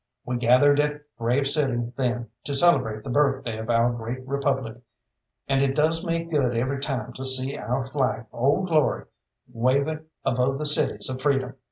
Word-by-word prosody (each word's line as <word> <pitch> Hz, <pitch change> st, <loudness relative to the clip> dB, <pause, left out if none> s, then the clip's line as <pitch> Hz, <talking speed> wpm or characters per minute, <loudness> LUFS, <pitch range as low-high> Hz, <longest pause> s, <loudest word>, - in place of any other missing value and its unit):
We 125 Hz, 0 st, -2 dB
gathered 130 Hz, +5 st, +4 dB
at 150 Hz, 0 st, 0 dB, 0.2 s
Grave 125 Hz, +4 st, +1 dB
City 130 Hz, -5 st, -1 dB
then 125 Hz, -2 st, -1 dB, 0.2 s
to 140 Hz, -, -1 dB
celebrate 110 Hz, -9 st, +3 dB
the 125 Hz, -, -5 dB
birthday 135 Hz, -4 st, +1 dB
of 110 Hz, +1 st, -6 dB
our 115 Hz, +1 st, +3 dB
great 120 Hz, +3 st, -6 dB
republic, 135 Hz, -4 st, -1 dB, 0.7 s
and 135 Hz, 0 st, +2 dB
it 135 Hz, -1 st, +1 dB
does 160 Hz, +3 st, +2 dB
me 165 Hz, -2 st, -1 dB
good 140 Hz, -8 st, 0 dB
every 130 Hz, +3 st, -1 dB
time 135 Hz, -3 st, -3 dB
to 130 Hz, -, -7 dB
see 130 Hz, +1 st, +1 dB
our 125 Hz, +5 st, -2 dB
flag 130 Hz, -4 st, -1 dB
Old 140 Hz, +10 st, +1 dB
Glory 155 Hz, -3 st, +2 dB, 0.5 s
waving 140 Hz, +6 st, +1 dB, 0.2 s
above 125 Hz, +3 st, +1 dB
the 150 Hz, -, -3 dB
cities 150 Hz, -, +1 dB
of 130 Hz, -1 st, -4 dB
freedom. 135 Hz, -2 st, +1 dB
135 Hz, 170 wpm, -25 LUFS, 120-145 Hz, 0.7 s, gathered